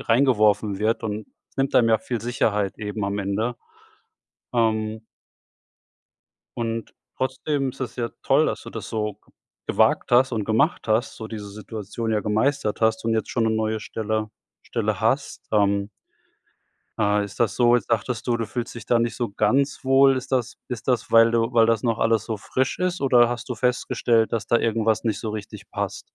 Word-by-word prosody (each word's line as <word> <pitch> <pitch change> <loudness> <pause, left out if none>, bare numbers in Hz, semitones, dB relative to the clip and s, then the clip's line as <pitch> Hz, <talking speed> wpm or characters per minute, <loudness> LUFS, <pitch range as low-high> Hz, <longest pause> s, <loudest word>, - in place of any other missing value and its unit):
reingeworfen 110 -5 +3
wird 110 +3 0
und 105 -1 -4 0.3
nimmt 135 0 0
einem 115 -2 +5
ja 110 - +4
viel 120 0 -4
Sicherheit 105 -4 -1
eben 105 -1 -3
am 100 +1 -2
Ende. 105 +5 -1 1.0
Ähm 110 -1 0 1.5
und 115 -1 -3 0.2
trotzdem 135 +1 -1
ist - - -17
das 130 -3 -4
ja 115 -1 -2
toll, - - +3
dass - - -3
du - - -9
das - - -7
so 105 -2 -3 0.5
gewagt - - +2
hast 125 +2 +4
und 110 -3 -1
gemacht 115 - +1
hast, 110 +4 +1
so 110 - -7
diese 105 -2 -7
Situation 110 +2 -5
ja 105 - +1
gemeistert 110 +2 0
hast 110 0 +2
und 115 - +1
jetzt 110 - -1
schon 115 - +1
'ne 110 - +2
neue 110 0 -1
Stelle 110 0 -3 0.3
Stelle - - -2
hast. - - -1
Ähm 100 -1 +2 1.1
äh, 105 -1 +2
ist 100 -1 -10
das 115 - +2
so 120 -1 +5
jetzt 120 - -4
sagtest 115 0 -1
du, 120 -1 +2
„du 115 -1 -3
fühlst 120 +1 -5
dich 120 - -9
da 120 - +3
nicht 115 0 -1
so 120 -2 -1
ganz 130 +9 +1
wohl.“ 135 0 +5
Ist 130 +1 -6
das 125 -2 0
ist 125 -1 -6
das, 125 -2 0
weil 115 0 +7
du 115 +1 +1
weil 115 -1 +5
das 115 -2 +1
noch 115 -2 0
alles 115 -1 +2
so 110 - -3
frisch 130 +5 -2
ist 180 0 -1
oder 125 -3 +5
hast 120 0 -5
du 125 - -2
festgestellt, 120 -1 +1
dass 115 -3 -1
da 120 - +3
irgendwas 110 -1 +1
nicht 110 -3 -1
so 110 - -3
richtig 105 -1 -8
passt? - - -3
115 Hz, 185 wpm, -24 LUFS, 110-120 Hz, 1.5 s, weil